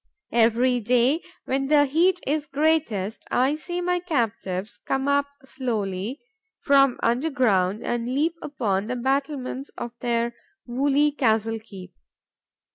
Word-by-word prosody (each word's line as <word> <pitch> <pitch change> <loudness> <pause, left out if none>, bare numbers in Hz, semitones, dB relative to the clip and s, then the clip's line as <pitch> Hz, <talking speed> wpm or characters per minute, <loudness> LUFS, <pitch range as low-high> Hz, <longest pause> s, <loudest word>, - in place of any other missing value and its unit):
Every 240 +2 +3
day, 250 +7 +2 0.2
when 270 +1 -1
the 290 0 +5
heat 345 +6 +2
is 300 +1 -1
greatest, 275 -9 0
I 260 +3 +2
see 350 +3 -4
my 360 0 +1
captives 225 - -2
come 270 0 -2
up 285 0 +2 0.2
slowly 225 -3 -3 0.4
from 275 -3 +4
under 245 +7 +1
ground 205 -7 +1
and 240 -1 -2
lean 310 +4 +2
upon 210 -8 -1
the 250 - -2
battlements 270 +1 -2
of 240 - -5
their 235 -1 0 0.3
woolly 280 +4 +2
castle 225 -5 +1
keep. 195 -5 -12
255 Hz, 125 wpm, -24 LUFS, 225-285 Hz, 0.4 s, the